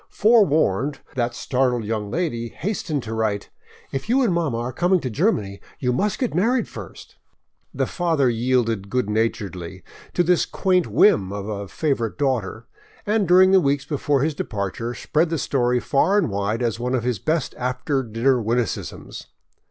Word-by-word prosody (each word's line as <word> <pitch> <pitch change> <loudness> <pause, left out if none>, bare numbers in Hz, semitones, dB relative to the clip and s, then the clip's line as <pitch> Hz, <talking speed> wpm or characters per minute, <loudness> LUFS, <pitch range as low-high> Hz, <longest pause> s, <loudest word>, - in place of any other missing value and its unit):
Forewarned, 150 - +3 0.2
that 120 -1 -1
startled 125 -3 0
young 105 -1 -3
lady 120 - -2
hastened 160 - -3
to 110 - -5
write: 110 -2 -2 0.4
"If 135 +10 -4
you 265 +3 +3
and 215 -7 +2
mama 160 -9 0
are 120 +2 -3
coming 180 +5 +2
to 130 - -3
Germany, 105 - 0 0.2
you 125 -2 0
must 205 +10 0
get 250 - -1
married 230 +9 +1
first." - - -11 0.5
The - - -1
father 165 -7 +1
yielded 115 -4 0
good 125 -2 -1
naturedly 95 -5 -2 0.3
to 175 - +3
this 175 0 +2
quaint 185 -3 +1
whim 110 - +4
of 100 0 -5
a 100 -2 -4
favorite 125 - -2
daughter, 120 -5 -1 0.4
and 210 -2 +1
during 185 +2 +6
the 190 -1 +6
weeks 140 -2 0
before 145 -2 0
his 155 +1 0
departure, 110 0 -4
spread 160 +2 0
the 165 - -1
story 125 -3 +1
far 150 - +2
and 175 - +1
wide 100 +4 -1
as 115 -1 -1
one 125 +2 -1
of 120 - -1
his 120 -4 -1
best 155 - -1
after 130 +2 -1
dinner 120 +2 +1
witticisms. 115 0 -3
125 Hz, 165 wpm, -22 LUFS, 115-165 Hz, 0.5 s, during